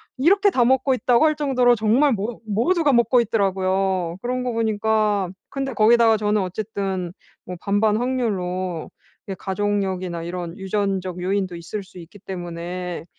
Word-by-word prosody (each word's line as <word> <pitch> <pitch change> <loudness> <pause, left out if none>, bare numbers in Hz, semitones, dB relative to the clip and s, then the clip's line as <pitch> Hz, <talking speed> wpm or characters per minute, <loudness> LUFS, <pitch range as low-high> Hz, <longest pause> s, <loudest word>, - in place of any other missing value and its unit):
'이렇게 390 +9 +4
다 255 -9 +2
먹고 265 +2 +3
있다고?' 250 +2 +3
할 310 -1 +3
정도로 255 -4 +3
정말 235 +6 +3
모 215 +3 -4
모두가 285 - +2
먹고 240 +1 +4
있더라고요. 190 -4 0
그런 250 +1 -2
거 245 - -1
보니까 215 -3 +1 0.2
근데 270 -1 -3
거기다가 225 +1 +5
저는 210 -1 +1
어쨌든 190 -2 -3 0.3
뭐 180 - -7
반반 210 +2 +1
확률로 185 -9 -2 0.4
이게 195 - -4
가족력이나 190 -3 -2
이런 175 +1 -5
유전적 195 -2 -2
요인도 185 -1 -1
있을 175 +5 -6
수 190 -1 -16
있기 175 +5 -13
때문에. 175 -1 -6
205 Hz, 330 characters per minute, -22 LUFS, 185-240 Hz, 0.4 s, 거기다가